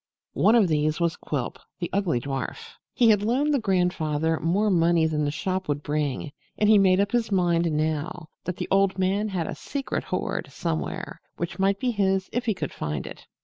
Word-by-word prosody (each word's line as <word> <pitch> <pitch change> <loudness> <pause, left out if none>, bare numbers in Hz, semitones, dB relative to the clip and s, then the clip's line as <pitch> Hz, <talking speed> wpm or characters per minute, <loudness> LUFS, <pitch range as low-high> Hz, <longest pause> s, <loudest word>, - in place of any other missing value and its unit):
One 220 - +4
of 220 -5 +5
these 155 0 +1
was 170 -1 +1
Quilp, 140 -5 -4 0.2
the 175 -2 -4
ugly 185 -10 +1
dwarf. 140 - -5 0.2
He 235 -3 +4
had 205 -2 +3
loaned 265 +8 +1
the 280 - +3
grandfather 165 -6 0
more 200 +6 +1
money 170 -2 +3
than 150 -2 0
the - - +1
shop 185 +5 -2
would 145 0 -2
bring, 145 -1 -2 0.3
and 210 - +2
he 215 -1 +7
made 190 -1 +4
up 200 0 +1
his 235 -3 0
mind 170 -3 +2
now 155 +2 -2 0.2
that 180 0 -3
the - - -3
old 195 -1 +3
man 195 +3 +1
had 185 -5 -2
a - - -4
secret 280 -2 -4
hoard - - -3
somewhere, - - -4 0.2
which 170 +2 -4
might 195 +1 +2
be 255 -1 0
his 195 -3 0
if 245 +1 -2
he 220 - +2
could 150 -6 -4
find 75 -3 -3
it. - - -10
180 Hz, 200 wpm, -25 LUFS, 155-200 Hz, 0.3 s, he